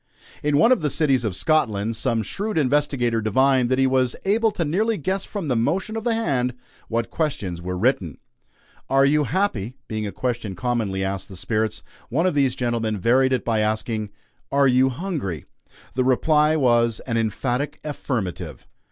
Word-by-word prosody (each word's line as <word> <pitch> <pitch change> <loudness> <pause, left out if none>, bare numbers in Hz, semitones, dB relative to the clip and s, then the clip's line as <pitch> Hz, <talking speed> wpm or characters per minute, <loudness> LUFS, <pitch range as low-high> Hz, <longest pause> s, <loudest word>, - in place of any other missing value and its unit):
In 145 -1 +1
one 165 - +5
of 255 - +4
the 150 - +1
cities 135 -3 +2
of 105 -5 -2
Scotland, 115 - +1
some 115 -1 0
shrewd 205 - -3
investigator 135 -5 +1
divined 130 +3 +3
that 130 - +2
he 135 - +3
was 130 -2 +2
able 220 +3 +3
to 175 -5 -2
nearly 210 +8 +1
guess 190 +5 -2
from 200 -6 -5
the 130 - +1
motion 190 - 0
of 225 - -3
the 235 -1 +1
hand 130 - 0 0.3
what 115 0 -2
questions 120 - -2
were 90 +1 -4
written. 95 - 0 0.7
"Are 135 0 +4
you 150 +1 +3
happy?" 130 - -1
being 110 -1 -3
a - - -5
question 120 -6 -3
commonly 110 -3 -1
asked 95 0 -3
the 95 - -10
"spirits," 110 +3 -1 0.3
one 160 +8 +1
of 185 - +2
these 135 -3 +2
gentlemen 115 -4 -1
varied 130 +7 +3
it 130 -3 0
by 115 -2 +1
asking: 110 0 -1 0.4
"Are 140 0 +4
you 130 +1 +4
hungry?" 130 - -4 0.5
The 130 - +1
reply 150 +4 +3
was, 120 -5 +2
an 115 - -3
emphatic 120 +5 -1
affirmative. 125 - -4
130 Hz, 175 wpm, -23 LUFS, 110-150 Hz, 0.7 s, one